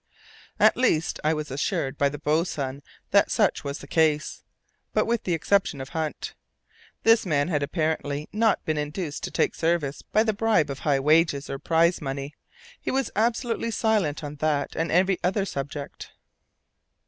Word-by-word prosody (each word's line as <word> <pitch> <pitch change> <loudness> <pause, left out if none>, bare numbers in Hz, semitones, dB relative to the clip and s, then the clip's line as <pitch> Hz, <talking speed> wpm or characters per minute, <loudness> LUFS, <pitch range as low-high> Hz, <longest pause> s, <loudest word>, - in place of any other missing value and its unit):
At - - +6
least, 165 -11 +1
I 155 +1 +2
was 150 -2 -5
assured 135 0 -1
by 140 0 +2
the 145 - -6
boatswain 150 -3 -1 0.3
that - - +4
such - - +1
was 140 +1 -4
the - - -11
case, 155 -2 +1 0.5
but - - +2
with 230 0 -1
the 175 - +1
exception 165 -2 +1
of 135 +1 -6
Hunt. 160 -2 -4 0.7
This 225 0 +5
man 155 -3 0
had 150 -4 0
apparently 150 -1 -2
not 220 0 +2
been 155 -1 0
induced 150 +1 -4
to - - -5
take - - +1
service 160 -4 -1
by 215 - +1
the 220 -1 0
bribe 210 -9 +2
of 135 - -6
high 140 -3 +1
wages 150 0 +2
or 135 - -4
prize 165 +4 +2
money. 140 0 -4 0.5
He - - -3
was 265 -3 0
absolutely 230 +1 0
silent 210 -10 0
on 145 0 -6
that 145 -2 -1
and 165 +1 -1
every 185 +1 +3
other 195 +2 +1
subject. 140 -3 -6
155 Hz, 170 wpm, -25 LUFS, 145-190 Hz, 0.7 s, At